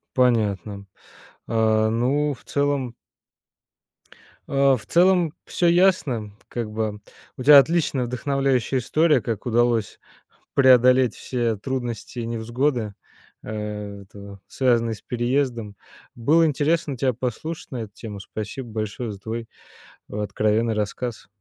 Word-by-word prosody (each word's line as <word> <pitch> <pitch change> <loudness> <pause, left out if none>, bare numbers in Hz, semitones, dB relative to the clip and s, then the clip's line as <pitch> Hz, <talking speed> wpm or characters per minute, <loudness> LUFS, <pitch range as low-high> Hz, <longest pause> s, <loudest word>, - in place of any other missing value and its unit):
Понятно. 105 -5 +1 0.6
А, 110 -1 +2
ну 135 +6 +1
в 115 -5 -14
целом 140 -1 -1 1.5
А, 140 -1 +3
в - - -13
целом 175 -2 +3
всё 175 - 0
ясно, 170 - +2 0.2
как 120 -3 -4
бы 105 -1 -3 0.4
у 130 - -5
тебя 145 +1 +10
отличная 150 -3 +1
вдохновляющая 135 0 0
история, 155 +5 +2
как 115 -3 -4
удалось 120 -2 +1 0.6
преодолеть 130 -2 +5
все 120 -3 -1
трудности 120 +1 -4
и 115 - -4
невзгоды, 115 0 -1 0.5
а, - - -11 0.5
этого, 100 0 -12
связанные 115 -3 +1
с - - -14
переездом. 120 -3 -1 0.4
Было 155 +8 +3
интересно 150 0 0
тебя 130 +1 +1
послушать 130 +8 -5
на - - -3
эту 105 -2 -9
тему. 105 -3 -8
Спасибо 110 +6 -6
большое 110 +2 -4
за 100 - -9
твой 115 +3 -5 0.6
откровенный 105 +2 0
рассказ. 110 +2 -4
120 Hz, 120 wpm, -23 LUFS, 110-135 Hz, 1.5 s, тебя